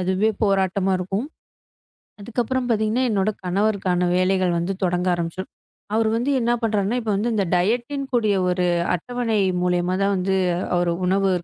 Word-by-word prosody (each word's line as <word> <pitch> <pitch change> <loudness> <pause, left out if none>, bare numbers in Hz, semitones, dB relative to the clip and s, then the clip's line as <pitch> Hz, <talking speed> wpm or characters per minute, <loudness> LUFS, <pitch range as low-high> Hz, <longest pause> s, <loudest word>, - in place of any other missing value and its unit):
அதுவே 190 +4 +1
போராட்டமா 195 -1 +1
இருக்கும். 195 +7 -3 0.9
அதுக்கப்புறம் 245 +4 -2
பாத்தீங்கன்னா 220 +2 +1
என்னோட 205 0 +1
கணவருக்கான 185 -2 +1
வேலைகள் 185 -1 +2
வந்து 170 +3 -1
தொடங்க 180 0 0
ஆரம்பிச்சுரும். 175 +2 -4 0.4
அவரு 220 0 +2
வந்து 245 +5 0
என்ன 235 0 +1
பண்றேன்னா, 215 +1 0
இப்ப 220 - -2
வந்து 230 +4 0
இந்த 205 -2 +1
டயட்ன்னு 240 +9 0
கூடிய 215 -4 +2 0.2
ஒரு 180 0 0 0.3
அட்டவணை 230 +4 -2 0.2
மூலியுமா 180 0 +1
தான் 200 0 +2
வந்து 190 +1 0 0.4
ஒரு 175 -1 +1
உணவு 195 +1 +2
195 Hz, 140 wpm, -22 LUFS, 185-225 Hz, 0.9 s, வேலைகள்